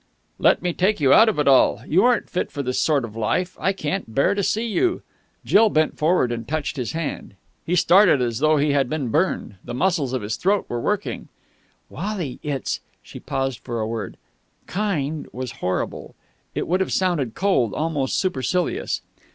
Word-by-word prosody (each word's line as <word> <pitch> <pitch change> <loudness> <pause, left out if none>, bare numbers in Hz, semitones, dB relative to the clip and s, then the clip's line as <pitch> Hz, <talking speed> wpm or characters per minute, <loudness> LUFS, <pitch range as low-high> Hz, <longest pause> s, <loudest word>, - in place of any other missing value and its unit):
"Let - - +3
me 175 -1 0
take 195 +4 +1
you 135 -3 +5
out 225 - +7
of 215 - -2
it 150 - +1
all! 135 -2 +4
You 175 +5 +3
aren't 245 -1 +2
fit 180 - -3
for 140 - -4
this 125 0 -1
sort 145 -5 +2
of 110 -2 -11
life. 175 +11 -1
I 190 - +1
can't 155 - -4
bear 140 - +3
to 200 - -1
see 220 +4 0
you...." 345 - 0 0.4
Jill 220 +1 +5
bent 155 -4 +1
forward 155 -5 +2
and 115 -1 -4
touched 150 -1 -2
his 125 -4 -3
hand. 160 -10 -5 0.3
He 175 - +1
started 180 -2 +5
as 120 -2 -1
though 155 +1 +3
he 145 +1 +2
had 140 -3 +1
been 145 -5 -2
burned. 155 - -1
The 120 - -6
muscles 155 -4 +1
of 130 -4 -2
his 105 +1 -3
throat 200 +2 +1
were 120 -1 -3
working. 210 - -2 0.6
"Wally, 190 -11 -4
it's 140 -3 -3
" - - -41
She - - -10
paused 135 -3 -3
for 120 -1 -5
a 110 - -1
word. 110 -3 -5 0.5
"Kind" 160 -7 -2
was 125 0 -5
horrible. 90 0 -3 0.4
It - - -2
would 180 +3 +1
have 190 - -1
sounded 170 - 0
cold, 180 - +1
almost 150 -4 -1
supercilious. 180 0 -1
150 Hz, 190 wpm, -22 LUFS, 125-185 Hz, 0.6 s, out